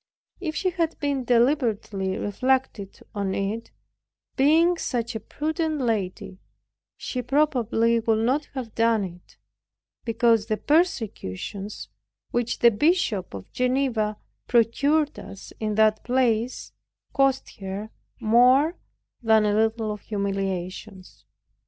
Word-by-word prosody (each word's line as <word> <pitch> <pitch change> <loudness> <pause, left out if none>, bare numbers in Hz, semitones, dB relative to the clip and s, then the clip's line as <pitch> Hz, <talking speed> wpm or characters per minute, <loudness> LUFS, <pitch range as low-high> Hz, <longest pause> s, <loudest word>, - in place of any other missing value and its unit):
If 315 -4 -4
she 370 -2 0
had 330 -2 -1
deliberately 240 -8 +1
reflected 250 -2 -1
on 200 -2 -2
it, 210 +4 -3 0.7
being 320 +6 +4
such 235 -2 -2
a 220 - -3
prudent 315 +4 -2
lady, 195 -6 -2 0.6
she 250 - -4
probably 240 -4 +2
would 225 0 +1
not 280 +5 +1
have 245 -4 -5
done 225 -2 +2
it; 180 -1 -10 0.7
because 230 -1 +2
the 215 -1 0
persecutions, 210 - -1 0.4
which 240 0 -1
the 235 - +5
Bishop 230 - +1
of 95 - -10
Geneva 250 -5 0 0.3
procured 280 +6 +2
us 195 0 -11
in 215 -1 -2
that 215 0 +3
place, 245 -1 0 0.4
cost 275 -1 +1
her 200 +3 -6 0.3
more 250 +8 +4 0.4
than 220 -2 +4
a 205 - +2
little 220 0 +1
of 210 -1 -6
humiliations. 195 -1 -4
230 Hz, 110 wpm, -25 LUFS, 210-265 Hz, 0.7 s, the